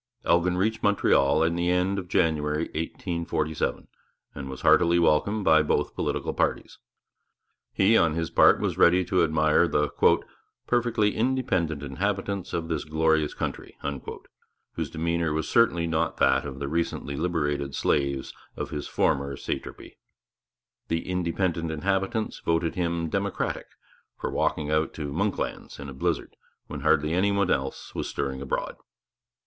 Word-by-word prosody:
Elgin 90 +1 +2
reached 110 +4 0
Montreal 80 -7 +3
in 85 +1 +1
the 85 0 0
end 90 +2 +1
of 90 - -7
January 75 -2 +1
1847, 80 -1 -2 0.5
and 70 -1 -7
was 65 - -7
heartily 85 0 +5
welcomed 90 +6 +2
by 80 0 +6
both 75 - 0
political - - -2
parties. - - -1 0.9
He, 100 +4 +3
on 80 -7 +3
his 80 -1 -2
part, - - +6
was - - -2
ready 90 +1 +5
to 90 0 +2
admire 80 +1 +3
the 75 -2 +1 0.8
'perfectly 120 -4 +1
independent 105 - 0
inhabitants' 95 +6 -2
of 85 -1 -2
this 80 - -2
'glorious 80 -1 +1
country,' - - -5 1.0
whose - - -3
demeanour 85 0 -1
was 80 0 -2
certainly 95 -8 +3
not 80 -1 -1
that 65 0 +3
of 65 -2 -6
the 70 0 -4
recently 80 -2 -2
liberated 75 -4 -1
slaves 70 -2 0 0.2
in - - -2
his 75 - -5
former 70 0 0
satrapy. - - -6 0.9
The 80 0 -2
'independent 85 -2 -1
inhabitants' 95 +7 -1
voted 80 0 0
him 85 -2 -1
'democratic' 100 +4 -2 0.5
for - - -4
walking 75 -1 0
out 75 +1 0
to 75 -3 -5
'Monklands' - - -3
in 70 0 -7
a - - -8
blizzard, 65 - -2 0.3
when - - -7
hardly 75 +2 +2
any 95 +3 +2
one 100 -1 +1
else 65 0 -2
was - - -3
stirring 65 -1 -3
abroad. 70 - -3
85 Hz, 145 wpm, -26 LUFS, 75-90 Hz, 1.0 s, by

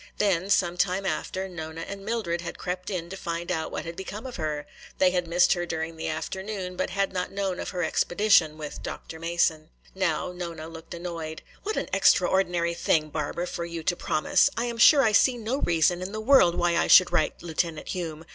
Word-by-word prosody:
Then, 190 -2 +1
some 175 -3 +2
time 190 +1 0
after, 190 +2 -2
Nona 160 -2 -7
and 195 +3 -7
Mildred 200 -6 -2
had 170 - -6
crept 180 0 -4
in 180 -4 -3
to - - -5
find 170 -1 -4
out 160 -2 -2
what - - -4
had 165 0 -6
become 200 +5 -7
of 255 - -6
her. 150 -3 -3 0.3
They 185 -1 +4
had 180 -1 -1
missed 175 +2 +4
her 175 - -2
during 160 0 -3
the 160 - -5
afternoon, 185 +4 -4
but - - -1
had 195 +1 -1
not 180 -1 -2
known 195 -2 -2
of - - -4
her 180 -2 -2
expedition 175 -5 +3
with 150 -2 -7
Dr. 160 - -7
Mason. 165 -2 0 0.2
Now 180 -3 -1
Nona 170 -3 -6
looked 165 +1 -9
annoyed. 165 -2 -6 0.2
"What 430 +1 -3
an - - -1
extraordinary 175 -3 +3
thing, 160 -2 +1
Barbara, 155 +3 -3
for 175 - -4
you 170 -1 -5
to 175 - +1
promise! 155 - +2
I 235 - 0
am 235 -1 -4
sure 280 +4 +7
I 220 - +3
see 245 +4 +4
no 230 +3 -2
reason 175 - +2
in 185 +2 -5
the 215 - -3
world 215 -7 +5
why 175 -1 +1
I - - +2
should 185 - +7
write 155 - 0
Lieutenant 165 -1 -2
Hume. 165 -3 -4
175 Hz, 210 wpm, -26 LUFS, 165-190 Hz, 0.3 s, sure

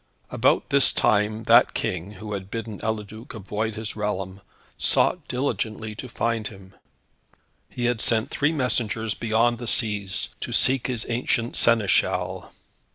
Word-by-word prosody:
About - - +2
this 140 -1 +6
time 110 -1 +1
that - - +5
King, 90 +3 -3
who 105 +1 -7
had 95 -1 -5
bidden 110 -1 -5
Eliduc 110 +1 -5
avoid 110 +1 -3
his 110 0 -4
realm, 95 -2 -3 0.3
sought 180 -4 +2
diligently 110 -4 -2
to 125 +4 -8
find 115 -2 -1
him. 95 -2 -13 1.0
He 120 - -4
had 120 -2 +1
sent 110 -1 +1
three 145 +2 +1
messengers 115 -6 -1
beyond 115 +1 +1
the 120 - -6
seas 105 -5 -1
to - - -5
seek 130 -1 +3
his 120 -4 -2
ancient 120 0 -1
Seneschal. 115 -4 +2
110 Hz, 140 wpm, -24 LUFS, 105-120 Hz, 1.0 s, this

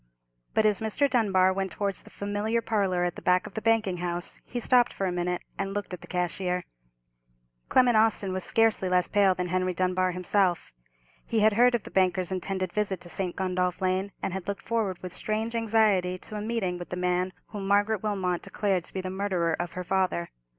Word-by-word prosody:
But 220 - +3
as 210 0 +3
Mr. 220 +6 +1
Dunbar 190 -7 +3
went 190 -1 -3
towards 200 -2 -2
the - - -15
familiar 205 +3 -1
parlour 195 -6 0
at 175 -1 -1
the - - -8
back 180 0 +3
of - - -9
the 220 - -4
banking 220 -5 +2
house, 175 0 -3
he 245 - -4
stopped 245 0 +4
for 195 - -2
a 185 - 0
minute, 180 0 -2 0.2
and 195 0 -2
looked 205 -2 -4
at 180 - -6
the - - -11
cashier. 180 0 -1 1.1
Clement 250 -2 +4
Austin 215 -3 +3
was 185 0 -3
scarcely 225 -4 +2
less 180 -1 +3
pale 195 -2 +4
than 180 0 -3
Henry 185 0 0
Dunbar 185 0 +1
himself. 180 - 0 0.5
He 225 -2 +1
had 215 0 +5
heard 245 +3 +5
of 230 - -2
the - - -10
banker's 185 0 +1
intended 185 -1 -2
visit 200 -3 -1
to 175 - -7
St. 180 -1 -2
Gundolph 180 -1 -1
Lane, 190 +1 0
and 185 - -1
had 190 -1 -5
looked 200 -1 -4
forward 220 -5 -1
with 180 -1 -6
strange 220 +4 -2
anxiety 215 -5 +2
to 215 - -8
a 210 - -3
meeting 210 -5 -2
with 175 - -8
the 180 - -4
man 180 +1 0 0.2
whom 200 -3 -5
Margaret 205 +1 +2
Wilmot 190 -4 -1
declared 195 -4 -1
to - - -6
be 190 - -1
the 185 0 -4
murderer 185 -4 0
of 175 +1 -3
her 180 - -4
father. 185 - 0
190 Hz, 210 wpm, -27 LUFS, 180-210 Hz, 1.1 s, had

